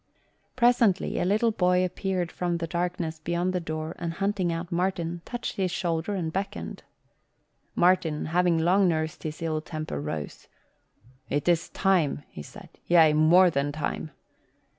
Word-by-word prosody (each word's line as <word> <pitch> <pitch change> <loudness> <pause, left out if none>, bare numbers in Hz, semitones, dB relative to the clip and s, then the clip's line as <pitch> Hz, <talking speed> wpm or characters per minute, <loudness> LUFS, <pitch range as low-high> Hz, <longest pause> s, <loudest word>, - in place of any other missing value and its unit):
Presently 235 -6 +3
a - - 0
little 215 +5 +2
boy 180 -2 +2
appeared 185 -1 -2
from 175 -1 -1
the 170 - -3
darkness 170 -1 -3
beyond 175 +3 -1
the 180 - 0
door 155 -1 -5
and 170 -1 -3
hunting 195 -1 0
out 165 +1 -4
Martin, 175 -1 -1
touched 240 -1 -5
his 190 -2 +1
shoulder 170 +2 -2
and 165 -4 -3
beckoned. 195 +2 -4 0.9
Martin, 175 -4 +2
having 175 -1 +3
long 180 +4 +3
nursed 155 -2 -1
his 155 +1 -6
ill 155 -1 -1
temper, 155 - -5
rose. 75 0 -6 0.8
"It 145 +3 -1
is 170 -1 +2
time," 175 -7 +1
he 75 - -9
said, - - -12 0.2
"yea, 165 -3 +6
more 170 +4 +6
than 140 0 0
time." 155 +1 -3
175 Hz, 150 wpm, -27 LUFS, 160-185 Hz, 0.9 s, yea